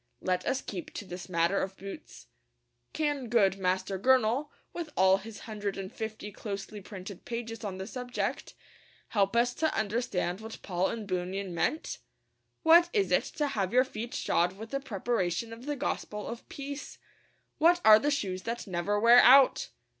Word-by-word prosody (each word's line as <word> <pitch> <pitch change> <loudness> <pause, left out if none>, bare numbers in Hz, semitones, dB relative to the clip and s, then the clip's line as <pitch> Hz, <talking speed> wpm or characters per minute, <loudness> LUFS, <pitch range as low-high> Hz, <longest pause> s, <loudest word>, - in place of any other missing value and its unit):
Let 180 -1 -1
us 270 - 0
keep 180 -4 -6
to - - -5
this 180 +1 -8
matter 170 +2 +2
of 190 0 -4
boots. 195 - -10 0.7
Can 290 -5 -1
good 195 -5 +3
Master 190 +1 -1
Gurnall, 255 +4 +3 0.2
with 340 -3 -5
all 190 +1 +5
his 210 +2 -10
hundred 205 -3 -4
and 195 -1 -6
fifty 220 -1 -6
closely 200 0 -6
printed 190 -2 -9
pages 230 -2 -5
on 195 -3 -4
the 190 - -5
subject, 245 +3 -4 0.5
help 200 0 +1
us 240 +1 +3
to 315 +3 0
understand 205 -4 -1
what 220 0 -8
Paul 180 0 0
and 220 -3 -5
Bunyan 185 0 -3
meant? 300 - -1 0.6
What 340 +2 +7
is 405 -3 +1
it - - +3
to 295 -2 0
have 195 -5 -2
your 255 +1 +6
feet 235 -1 -6
shod 175 +2 +1
with 220 +2 -9
the 275 - -1
preparation 225 -3 -2
of 235 +4 -11
the 295 - -1
gospel 210 -5 -3
of 235 0 -8
peace? 280 +1 -7 0.6
What 345 +3 +5
are 215 0 +9
the 290 - +1
shoes 190 -10 -1
that 230 +4 -4
never 190 +2 -1
wear 235 +3 +8
out? 265 +2 +6
215 Hz, 170 wpm, -29 LUFS, 190-245 Hz, 0.7 s, are